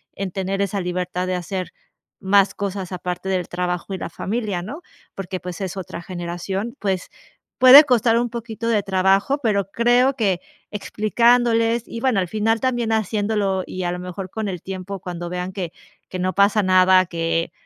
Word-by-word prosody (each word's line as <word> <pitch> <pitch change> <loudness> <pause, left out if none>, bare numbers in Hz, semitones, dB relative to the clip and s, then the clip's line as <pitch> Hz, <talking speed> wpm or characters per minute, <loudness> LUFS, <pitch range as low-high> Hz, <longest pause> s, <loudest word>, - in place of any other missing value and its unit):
en 195 -1 -3
tener 195 +1 -2
esa 200 0 -2
libertad 180 0 -2
de 185 - -1
hacer 180 +1 -4 0.5
más 195 +1 +3
cosas 195 -2 -4
aparte 180 +1 -4
del 185 -2 -1
trabajo 180 +1 -3
y - - -2
la - - -5
familia, 205 -3 -3
¿no? 280 - -7 0.3
Porque, 185 -1 -5
pues 180 -2 -7
es 190 -1 -3
otra 185 -2 -6
generación, 180 +6 -4
pues 190 -3 -2 0.5
puede 260 +3 +11
costar 235 -3 +3
un 240 0 -1
poquito 230 -1 -5
de 215 -3 +2
trabajo, 195 +8 +2
pero 200 -6 0
creo 245 +4 +3
que 195 -7 +1 0.3
explicándoles 230 +2 +2
y, 230 - -6
bueno, 255 -6 +2
al 185 - -1
final 220 +4 0
también 240 -3 0
haciéndolo 205 -2 0
y, 185 - -5
a 175 - -1
lo 180 - -5
mejor, 180 +1 -6
con 215 +1 -3
el 180 -3 -5
tiempo 190 +1 -6
cuando 175 -1 -6
vean 180 +1 -4
que 180 -4 -4 0.4
que 185 - -5
no 185 +1 0
pasa 200 +2 +4
nada, 185 0 +5
que 165 0 -1
195 Hz, 175 wpm, -21 LUFS, 180-225 Hz, 0.5 s, puede